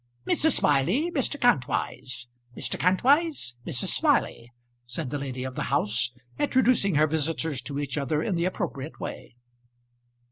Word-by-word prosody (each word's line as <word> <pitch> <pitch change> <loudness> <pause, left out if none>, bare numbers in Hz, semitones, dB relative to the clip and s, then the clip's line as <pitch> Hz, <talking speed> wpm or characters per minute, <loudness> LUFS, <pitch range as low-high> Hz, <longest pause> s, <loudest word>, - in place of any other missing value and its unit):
"Mrs. 315 - +3
Smiley, 180 - +2
Mr. 290 -1 -1
Kantwise. 130 - 0 0.3
Mr. - - -3
Kantwise, 255 - +2
Mrs. 130 -7 -2
Smiley," 120 +1 +1 0.3
said 125 +3 -5
the 145 - -2
lady 130 -2 -4
of 130 0 -5
the - - -3
house, 110 +3 +2 0.3
introducing 255 - +3
her 150 +1 +5
visitors 160 -2 -1
to 140 +2 -6
each 145 -1 -2
other 150 +3 0
in 210 - -1
the 170 0 0
appropriate 160 -6 -4
way. - - -7
150 Hz, 140 wpm, -26 LUFS, 130-200 Hz, 0.3 s, her